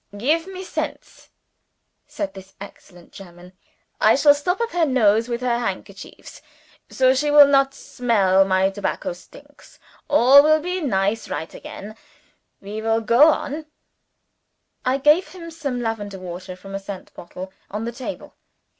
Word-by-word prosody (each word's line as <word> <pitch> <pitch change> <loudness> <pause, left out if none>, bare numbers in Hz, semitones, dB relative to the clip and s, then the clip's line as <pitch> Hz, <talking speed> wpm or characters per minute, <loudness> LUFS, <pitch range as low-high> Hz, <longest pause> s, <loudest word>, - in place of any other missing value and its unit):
"Gif 310 - 0
me 375 -1 -8
scents," - - -6 0.8
said 295 -1 -5
this 190 0 -13
excellent 180 -3 -14
German. 180 -1 -14 0.5
"I 215 - +5
shall 290 +1 +6
stop 360 +7 -2
up 465 0 -2
her 350 -1 +1
nose 225 -3 +2
with 235 0 -3
her 240 -1 0
handkerchiefs. 200 -3 -7 0.5
So 260 0 +3
she 295 +3 0
will 290 0 +8
not 275 -1 +2
smell 200 -6 +1
my 190 0 +1
tobacco 200 -2 -3
stinks 285 +11 -18 0.3
all 280 0 +7
will 310 +1 +3
be 360 +3 -3
nice 205 -5 -1
right 160 - -5
again 210 +2 -10 0.7
we 210 +2 -6
shall 225 0 +1
go 235 +7 +5
on." 305 0 -1 1.2
I 255 +1 +1
gave 300 +6 +3
him 335 -2 -10
some 280 -6 -4
lavender 205 -3 -4
water 185 0 -8
from 195 +2 -12
a 195 - -3
scent 195 -1 -9
bottle 185 +2 -10 0.2
on 210 +3 -5
the 235 - -3
table. 245 +2 -8
235 Hz, 150 wpm, -21 LUFS, 195-290 Hz, 1.2 s, will